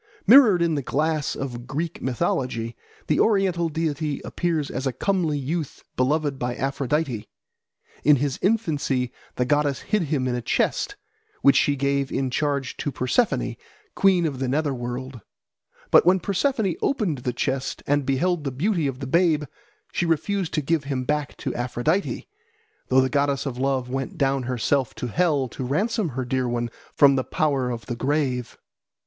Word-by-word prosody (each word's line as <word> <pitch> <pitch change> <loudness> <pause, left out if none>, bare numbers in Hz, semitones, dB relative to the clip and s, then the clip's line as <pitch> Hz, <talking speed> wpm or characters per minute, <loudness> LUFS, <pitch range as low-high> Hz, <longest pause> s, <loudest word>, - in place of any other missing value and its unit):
Mirrored 215 -6 +7
in 170 -1 +1
the 145 - 0
glass 155 +2 0
of 120 -3 -5
Greek 160 +5 -3
mythology, 120 -2 -1 0.3
the 150 - +1
oriental 190 -6 +2
deity 150 -2 -2
appears 165 -5 -1
as 130 +2 -2
a - - +1
comely 170 -1 0
youth 150 +2 -4
beloved 145 +1 +1
by 120 0 -2
Aphrodite. 135 -3 -1 0.7
In 150 - +6
his 140 -1 -1
infancy 145 - 0 0.2
the 125 - +1
goddess 145 0 +1
hid 215 -1 0
him 135 -4 0
in 125 - 0
a 120 - -2
chest, 410 - 0 0.5
which 140 - +6
she 145 - +3
gave 140 0 0
in 135 -2 -1
charge 140 -1 -1
to 145 - -2
Persephone, 135 - 0 0.4
queen 185 -3 +3
of 140 -5 -2
the 130 - -1
nether 145 +2 0
world. 125 0 -5 0.7
But - - +7
when 185 +1 +4
Persephone 200 - 0
opened 205 - 0
the 125 0 -2
chest 130 +2 -2
and 145 0 +2
beheld 155 +5 0
the 140 - -1
beauty 165 - 0
of 135 0 -5
the - - -3
babe, 160 +1 +3 0.5
she 175 - 0
refused 175 +3 0
to 155 - 0
give 155 0 0
him 135 -2 -2
back 150 +2 -2
to - - -3
Aphrodite, 120 +10 -1 0.6
though 130 +1 +5
the 130 - +2
goddess 140 0 0
of 125 -3 -4
love 135 -2 0
went 135 +1 -4
down 135 -1 +1
herself 130 +1 0
to 125 - -4
hell 150 -2 +1
to 130 - -6
ransom 200 - 0
her 130 - -1
dear 130 0 0
one 120 -1 -2 0.2
from 140 -1 +6
the 130 - +1
power 140 -4 0
of 115 -4 -5
the 120 - -4
grave. 130 -2 -1
140 Hz, 170 wpm, -24 LUFS, 130-165 Hz, 0.7 s, Mirrored